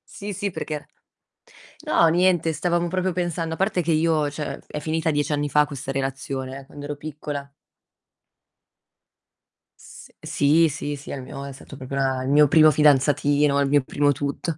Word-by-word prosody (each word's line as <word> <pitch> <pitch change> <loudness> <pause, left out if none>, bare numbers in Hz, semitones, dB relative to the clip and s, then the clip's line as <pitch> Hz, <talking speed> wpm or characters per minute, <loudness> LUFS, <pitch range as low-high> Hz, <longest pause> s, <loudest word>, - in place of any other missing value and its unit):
Sì, 205 +1 -6
sì, 200 +1 -3
perché 150 -3 -5 1.0
no, 165 - +4
niente, 175 -1 +2
stavamo 175 +1 0
proprio 185 +1 -1
pensando 170 -2 -2
a - - -7
parte 195 -2 +1
che 165 0 0
io, 155 -2 +2
cioè, 150 0 -5
è 150 - -6
finita 160 +1 -1
10 145 0 -1
anni 145 0 -1
fa 150 +2 +4
questa 135 -1 -6
relazione 135 0 -4
eh, 135 - -15
quando 145 0 -9
ero 145 0 -4
piccola 145 -1 -7 2.3
S - - -14
sì, 155 +3 +3
sì, 145 0 -4
sì, 140 - -12
è - - -3
il 135 - -6
mio 140 +1 -8
è 140 - -7
stato 140 0 -12
proprio 135 +1 -6
a 130 -1 0
il 130 - -3
mio 145 0 +5
primo 155 0 +7
fidanzatino, 145 0 +3
il 140 - +1
mio 145 0 +4
primo 145 +2 +1
tutto. 145 +3 -3
145 Hz, 175 wpm, -23 LUFS, 140-160 Hz, 2.3 s, primo